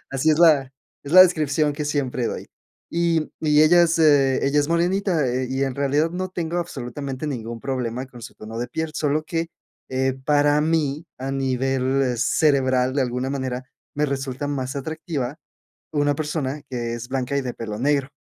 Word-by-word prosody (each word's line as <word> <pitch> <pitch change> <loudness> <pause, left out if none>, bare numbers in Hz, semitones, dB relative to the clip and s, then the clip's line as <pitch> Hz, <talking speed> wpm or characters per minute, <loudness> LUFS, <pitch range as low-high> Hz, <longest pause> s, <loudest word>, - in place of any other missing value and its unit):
Así 135 +4 +2
es 150 - +2
la 145 -6 +5 0.3
es 140 - -6
la 185 0 +11
descripción 155 -4 +2
que 150 +1 -4
siempre 135 -4 -1
doy. - - -5 0.4
Y 170 -2 +1
y 150 -1 +4
ella 175 +3 +6
es, 170 -1 +2
eh, 140 -4 +4
ella 140 +2 +2
es 145 - -1
morenita, 175 -1 +1
eh 125 +1 -1
y 135 +1 -1
en 135 -2 -3
realidad 145 +3 +1
no 185 +1 -3
tengo 170 -1 -2
absolutamente 140 -3 -5
ningún 115 -4 -5
problema 130 -1 -3
con 120 -3 -13
su - - -9
tono 110 +1 -8
de 120 - -2
piel, 160 0 -3
solo 150 +1 0
que, 165 +1 -2 0.4
eh, 130 0 0
para 145 0 +3
mí, 155 0 0
a 135 +1 -4
nivel 135 -1 0
cerebral, 130 -1 +2
de 140 - +2
alguna 125 +1 -2
manera 130 -2 -3 0.3
me 150 +1 +1
resulta 135 0 -3
más 130 -2 -3
atractiva, 150 -2 -4 0.6
una 145 -1 +2
persona 150 -2 -3
que 120 -2 -3
es 120 +1 -7
blanca 130 +1 -1
y - - +1
de 125 -2 -4
pelo 110 -2 -6
negro. 140 0 +1
140 Hz, 180 wpm, -23 LUFS, 130-155 Hz, 0.6 s, la